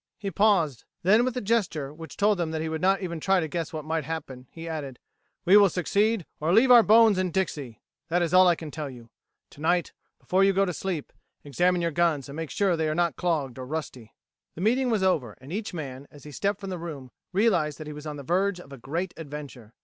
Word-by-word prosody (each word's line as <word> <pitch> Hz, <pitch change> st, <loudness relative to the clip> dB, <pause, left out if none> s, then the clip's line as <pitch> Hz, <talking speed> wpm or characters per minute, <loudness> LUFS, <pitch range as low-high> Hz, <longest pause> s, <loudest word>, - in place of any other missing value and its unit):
He 200 Hz, -2 st, -4 dB
paused; 185 Hz, -, +2 dB, 0.2 s
then, 210 Hz, +6 st, +5 dB
with 255 Hz, 0 st, -2 dB
a -, -, -1 dB
gesture 185 Hz, -10 st, -1 dB
which 160 Hz, -1 st, -10 dB
told 205 Hz, -1 st, +2 dB
them 170 Hz, -2 st, -1 dB
that 160 Hz, 0 st, -3 dB
he 160 Hz, -, -2 dB
would 160 Hz, 0 st, -3 dB
not 195 Hz, +2 st, +3 dB
even 170 Hz, -3 st, -4 dB
try 190 Hz, +4 st, +2 dB
to 160 Hz, -, -2 dB
guess 165 Hz, 0 st, -4 dB
what 155 Hz, -2 st, -6 dB
might 160 Hz, 0 st, -1 dB
happen, 135 Hz, -4 st, -6 dB
he 165 Hz, 0 st, -9 dB
added: 145 Hz, -6 st, -5 dB, 0.5 s
"We 190 Hz, +3 st, +7 dB
will 200 Hz, -2 st, +6 dB
succeed 200 Hz, +3 st, 0 dB
or 155 Hz, +3 st, 0 dB
leave 235 Hz, +7 st, +5 dB
our 240 Hz, -1 st, +10 dB
bones 220 Hz, -2 st, +5 dB
in 185 Hz, -1 st, 0 dB
Dixie! 150 Hz, -, -3 dB, 0.2 s
That 175 Hz, +1 st, +1 dB
is 170 Hz, 0 st, -2 dB
all 185 Hz, 0 st, +7 dB
I 175 Hz, -, +4 dB
can 160 Hz, -2 st, -8 dB
tell 150 Hz, -2 st, -5 dB
you. 120 Hz, -3 st, -13 dB, 0.4 s
Tonight, 170 Hz, +4 st, 0 dB, 0.2 s
before 190 Hz, +2 st, +1 dB
you 195 Hz, 0 st, +4 dB
go 195 Hz, +1 st, +3 dB
to 180 Hz, -, -3 dB
sleep, 175 Hz, -4 st, -4 dB, 0.3 s
examine 175 Hz, +5 st, +1 dB
your 170 Hz, -, 0 dB
guns 160 Hz, -4 st, +1 dB
and 140 Hz, -, -9 dB
make 160 Hz, -1 st, -5 dB
sure 200 Hz, -2 st, +1 dB
that 170 Hz, -, +1 dB
they 160 Hz, -1 st, 0 dB
are 155 Hz, -, -1 dB
not 175 Hz, 0 st, +1 dB
clogged 150 Hz, -8 st, -2 dB
or 130 Hz, -, -5 dB
rusty." 130 Hz, -7 st, -6 dB, 0.4 s
The 170 Hz, -, -7 dB
meeting 250 Hz, +5 st, +2 dB
was 215 Hz, -5 st, +1 dB
over, 140 Hz, -, 0 dB
and 135 Hz, +6 st, -10 dB
each 210 Hz, +1 st, -3 dB
man, 140 Hz, -5 st, -7 dB
as 145 Hz, -, -16 dB
he 150 Hz, -, -10 dB
stepped 200 Hz, +8 st, -1 dB
from 195 Hz, -1 st, -5 dB
the 180 Hz, -, -4 dB
room, 145 Hz, -7 st, -7 dB, 0.2 s
realized 185 Hz, -7 st, +2 dB
that 155 Hz, -, -8 dB
he 150 Hz, -, -7 dB
was 150 Hz, +1 st, -9 dB
on 150 Hz, -1 st, -5 dB
the 140 Hz, -, -8 dB
verge 185 Hz, +5 st, 0 dB
of 140 Hz, -5 st, -12 dB
a 135 Hz, -, -10 dB
great 170 Hz, +9 st, -3 dB
adventure. 140 Hz, -7 st, -9 dB
165 Hz, 245 wpm, -26 LUFS, 150-190 Hz, 0.5 s, our